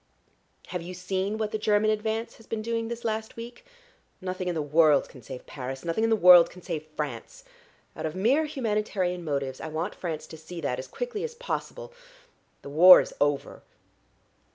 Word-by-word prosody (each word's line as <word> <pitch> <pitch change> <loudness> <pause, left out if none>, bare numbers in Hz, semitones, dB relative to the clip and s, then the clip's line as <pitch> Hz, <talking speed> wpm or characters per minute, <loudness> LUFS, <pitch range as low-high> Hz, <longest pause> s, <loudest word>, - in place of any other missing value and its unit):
Have 180 -1 -3
you 180 +2 -7
seen 190 +3 -2
what 215 -1 -2
the 215 - -2
German 210 0 +3
advance 220 +1 -2
has 225 - -18
been 220 -1 -3
doing 230 0 -2
this 235 0 -6
last 220 0 -3
week? 235 - -9 0.6
Nothing 185 0 -4
in 175 - -1
the 160 - -1
world 150 -1 +4
can 130 - -14
save 125 +2 -9
Paris, 135 +1 -7
nothing 170 +6 0
in 225 - +3
the 225 - +4
world 180 -4 +8
can 180 - -14
save 155 -4 -5
France. - - -5 0.5
Out - - -3
of 155 - -6
mere 255 +12 +2
humanitarian 210 - -2
motives 140 -4 -3
I - - -5
want 160 +5 -3
France 165 -4 -5
to 160 - -11
see 170 +2 -9
that 130 -4 -2
as 130 - -7
quickly 480 -3 -4
as 475 0 -5
possible. - - -5 0.7
The - - -8
war 175 +5 +9
is - - -3
over." 145 -1 0
185 Hz, 190 wpm, -27 LUFS, 160-225 Hz, 0.7 s, war